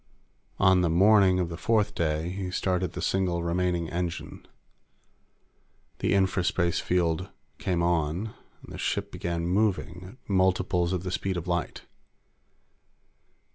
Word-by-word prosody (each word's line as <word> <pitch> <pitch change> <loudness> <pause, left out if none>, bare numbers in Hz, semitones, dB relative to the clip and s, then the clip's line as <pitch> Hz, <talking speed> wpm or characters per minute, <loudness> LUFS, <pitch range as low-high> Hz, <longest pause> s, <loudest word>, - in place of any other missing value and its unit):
On 95 -2 +4
the 85 - +2
"morning" 95 +1 +5
of 90 -2 -1
the 85 - -6
fourth 105 +2 +1
day, 80 -2 -1
he 95 0 -4
started 90 -1 -1
the - - -5
single 90 -3 0
remaining 85 0 0
engine. 85 -1 -4 1.5
The - - +1
infraspace 95 -3 +1
field 90 +1 0 0.3
came 90 -2 0
on, 85 +5 0 0.3
and - - -11
the - - -7
ship - - -2
began 85 -1 -3
moving 95 0 -1
at - - -37
multiples 90 -2 +1
of 90 -2 -2
the 90 - -4
speed 95 0 -2
of 85 - -5
light. 85 -1 -2
90 Hz, 135 wpm, -27 LUFS, 85-95 Hz, 1.5 s, morning